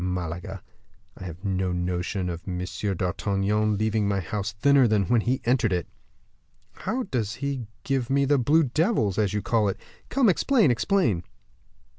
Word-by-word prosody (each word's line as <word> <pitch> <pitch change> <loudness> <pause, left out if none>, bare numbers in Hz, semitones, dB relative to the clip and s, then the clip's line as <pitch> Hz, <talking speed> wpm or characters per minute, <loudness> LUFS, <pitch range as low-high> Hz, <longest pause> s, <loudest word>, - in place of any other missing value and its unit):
Malaga! 90 +1 -4 0.5
I 95 - -9
have 90 +2 -8
no 95 -1 0
notion 90 +1 -2
of 85 -1 -4
M. 90 -1 -3 0.3
d'Artagnan 100 +3 0
leaving 110 0 +1
my 100 -1 +1
house 100 +3 -3
thinner 135 +5 +4
than 105 -2 +2
when 120 +1 +2
he 125 +4 -1
entered 120 -3 +2
it." 90 -3 0 0.9
"How 255 +3 -3
does 115 - -2
he 140 -5 -3 0.2
give 135 -3 -1
me 140 +1 +2
the 140 0 +3
blue 150 +6 +4
devils, 135 - +1
as 105 -1 +1
you 105 - -1
call 110 -3 +2
it? 95 - -4 0.3
Come, 270 -3 +3
explain, 210 - +3
explain." 120 - +1
105 Hz, 160 wpm, -25 LUFS, 95-135 Hz, 0.9 s, thinner